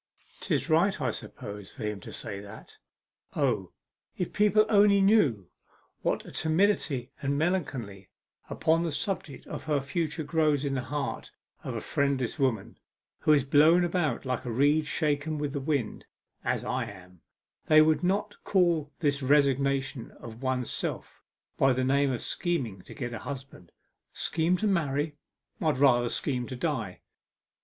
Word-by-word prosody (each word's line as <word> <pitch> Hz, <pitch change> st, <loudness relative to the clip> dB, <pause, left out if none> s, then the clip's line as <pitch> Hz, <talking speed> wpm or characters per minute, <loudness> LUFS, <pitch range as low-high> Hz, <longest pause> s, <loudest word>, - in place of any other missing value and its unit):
''Tis -, -, -1 dB
right, 170 Hz, +5 st, +3 dB
I -, -, 0 dB
suppose, 100 Hz, -1 st, -8 dB
for 130 Hz, -, -8 dB
him 105 Hz, -1 st, -3 dB
to -, -, -10 dB
say 100 Hz, -2 st, -5 dB
that. 100 Hz, +2 st, -12 dB, 0.6 s
O, 110 Hz, -10 st, 0 dB, 0.5 s
if 180 Hz, -, -3 dB
people 210 Hz, +1 st, +4 dB
only 205 Hz, -2 st, +5 dB
knew 175 Hz, -, +3 dB, 0.5 s
what -, -, -1 dB
a -, -, -10 dB
timidity 160 Hz, -6 st, +1 dB
and 140 Hz, 0 st, 0 dB
melancholy 135 Hz, -, -2 dB, 0.4 s
upon 160 Hz, +1 st, +2 dB
the 170 Hz, -1 st, -1 dB
subject 160 Hz, -, -3 dB
of -, -, -7 dB
her 150 Hz, -2 st, +1 dB
future 155 Hz, +3 st, -2 dB
grows 150 Hz, -2 st, +1 dB
up -, -, 0 dB
in -, -, -2 dB
the 130 Hz, -, -1 dB
heart 145 Hz, +4 st, -4 dB, 0.3 s
of -, -, -4 dB
a -, -, -2 dB
friendless 140 Hz, -1 st, -1 dB
woman 120 Hz, -7 st, -1 dB, 0.4 s
who -, -, +2 dB
is 145 Hz, -3 st, +5 dB
blown 155 Hz, +6 st, +5 dB
about 175 Hz, -4 st, 0 dB
like 130 Hz, 0 st, -2 dB
a 125 Hz, -, -5 dB
reed 145 Hz, +6 st, +2 dB
shaken 155 Hz, 0 st, 0 dB
with 145 Hz, -1 st, -3 dB
the 140 Hz, -, -2 dB
wind, 140 Hz, -5 st, -2 dB, 0.4 s
as -, -, -1 dB
I -, -, -1 dB
am, 90 Hz, -2 st, -13 dB, 0.5 s
they 155 Hz, -, +7 dB
would 155 Hz, +2 st, +4 dB
not 205 Hz, +3 st, -1 dB
call 170 Hz, -6 st, +2 dB
this 145 Hz, -2 st, +1 dB
resignation 140 Hz, -2 st, +1 dB
of 115 Hz, 0 st, -10 dB
one's 130 Hz, -2 st, -1 dB
self -, -, -4 dB, 0.4 s
by 135 Hz, -1 st, +5 dB
the 130 Hz, +1 st, 0 dB
name 140 Hz, +1 st, +2 dB
of 120 Hz, -, -3 dB
scheming 130 Hz, -, -2 dB
to -, -, -10 dB
get 120 Hz, -4 st, -4 dB
a 115 Hz, -, -5 dB
husband. 135 Hz, -10 st, -8 dB, 0.4 s
Scheme 170 Hz, +2 st, 0 dB
to 215 Hz, -, -2 dB
marry? 150 Hz, -5 st, 0 dB, 0.4 s
I'd 155 Hz, -4 st, +1 dB
rather 120 Hz, -3 st, +4 dB
scheme 125 Hz, -2 st, -1 dB
to 130 Hz, -, -6 dB
die! 125 Hz, -, -3 dB
140 Hz, 160 wpm, -28 LUFS, 125-160 Hz, 0.6 s, they